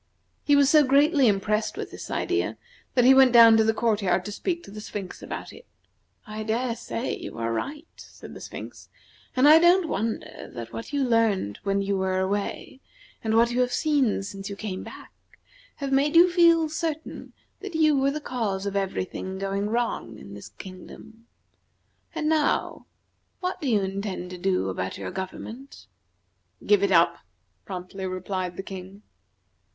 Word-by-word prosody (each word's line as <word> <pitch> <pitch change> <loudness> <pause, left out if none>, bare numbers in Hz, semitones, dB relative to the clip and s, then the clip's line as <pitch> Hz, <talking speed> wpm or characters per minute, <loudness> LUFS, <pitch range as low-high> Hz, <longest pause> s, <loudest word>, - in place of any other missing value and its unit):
He 290 - +4
was 285 -1 +5
so 300 +1 +6
greatly 280 +1 +4
impressed 210 +1 0
with - - -5
this - - -9
idea - - -1 0.4
that 245 -1 +4
he 265 - +8
went 265 -1 +6
down 230 -1 +9
to 220 - +4
the 220 - +3
court 220 -1 0
yard 180 -1 +1
to 210 - -5
speak 345 - -3
to - - -12
the 210 +1 -8
Sphinx 200 -3 -7
about - - -7
it. - - -15 0.6
"I 215 -1 -6
dare 230 +2 -1
say 235 +1 -4
you - - -8
are 115 0 -2
right," 295 - -4
said - - -12
the - - -10
Sphinx, - - -9 0.5
"and 260 +3 +5
I 310 +2 +9
don't 345 +1 +4
wonder 225 -5 -4
that 115 -1 -7
what 230 - -7
you 285 -1 0
learned 225 - +1
when 200 0 0
you 195 -1 -1
were 190 0 0
away, 200 +6 -3 0.4
and 220 -1 0
what 235 +1 +4
you 245 +1 +1
have 250 0 +1
seen 280 -11 +1
since 195 0 -7
you 200 - -5
came 195 -2 -5
back, - - -11 0.6
have 280 -1 -4
made 280 +3 +2
you 350 +2 +7
feel 335 -2 +5
certain 315 0 -5 0.3
that 400 -4 -7
you 310 -2 +4
were 275 0 +2
the 295 +2 -3
cause 215 -9 -3
of 200 0 -3
every 195 -2 -1
thing 190 +1 -6
going 195 +1 -2
wrong 225 - -2
in 100 - -11
this 100 - -10
kingdom. 220 +5 -12 0.9
And 305 - -1
now, 310 -1 0 0.5
what 365 -1 -3
do 285 - -1
you 215 -4 +3
intend 195 -2 -4
to 180 - -8
do 185 - 0
about 95 0 -4
your 95 -2 -5
government?" 225 +8 -8 0.8
"Give 205 -2 +4
it 200 -1 +1
up," 170 -1 +4 0.5
promptly 190 0 -6
replied 185 -1 -4
the 195 - -4
King. 190 +1 -9
220 Hz, 180 wpm, -25 LUFS, 190-275 Hz, 0.9 s, down